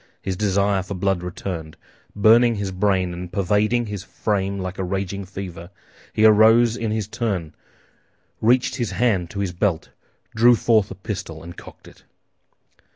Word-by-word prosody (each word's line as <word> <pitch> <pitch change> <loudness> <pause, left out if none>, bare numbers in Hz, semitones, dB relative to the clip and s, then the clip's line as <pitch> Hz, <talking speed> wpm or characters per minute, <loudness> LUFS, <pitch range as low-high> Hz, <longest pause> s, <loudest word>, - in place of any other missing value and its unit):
His 95 - -4
desire 100 0 +1
for 95 +1 -6
blood 95 -1 0
returned, 85 -3 -6 0.4
burning 115 +3 +5
his 100 -2 -3
brain 95 -1 0
and 90 0 -7
pervading 105 +5 +1
his 105 -3 -5
frame 100 -2 -2
like 95 0 -5
a - - -1
raging 95 +1 -3
fever; 90 -3 -8 0.4
he 110 - +2
arose 110 +2 +6
in 115 -3 -3
his 110 -1 -2
turn, 105 -8 -3 0.9
reached 125 +4 +2
his 120 -5 -2
hand 100 -8 +1
to 100 - -4
his 95 -3 -2
belt, 90 -2 -1 0.5
drew 120 +2 +6
forth 110 -3 +2
a - - -8
pistol, 90 -5 -6
and 85 +1 -10
cocked - - -13
it. - - -17
100 Hz, 155 wpm, -22 LUFS, 90-110 Hz, 0.9 s, arose